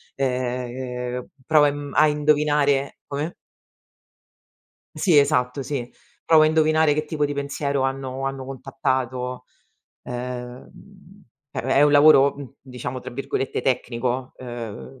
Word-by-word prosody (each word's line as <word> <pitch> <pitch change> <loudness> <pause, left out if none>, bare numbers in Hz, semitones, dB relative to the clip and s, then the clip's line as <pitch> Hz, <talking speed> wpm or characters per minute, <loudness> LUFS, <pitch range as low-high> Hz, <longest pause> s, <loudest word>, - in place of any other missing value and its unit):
ehm, 125 -1 -3 0.2
provo 155 -2 +5
a - - +5
imm 145 0 -6
a 155 - +6
indovinare 150 -2 +1
come? 145 +4 -4 1.6
Sì, 170 -7 +4
esatto, 125 -1 +2
sì. 130 -3 -4 0.3
Provo 160 -1 +6
a - - +6
indovinare 155 -1 +3
che 155 +1 -1
tipo 150 -1 -1
di 145 - -4
pensiero 140 -1 -2
hanno 135 0 -3
hanno 135 -1 -3
contattato. 130 -1 -3 0.6
Ehm, 125 +11 -9 0.3
è - - -6
è 135 +3 +2
un 150 - +5
lavoro, 145 -1 +7
mhmm, 140 -1 -10
diciamo, 125 0 -6
tra 130 - -8
virgolette 135 +1 -2
"tecnico", 125 0 -1
ehm 120 +1 -8
135 Hz, 125 wpm, -23 LUFS, 125-145 Hz, 1.6 s, lavoro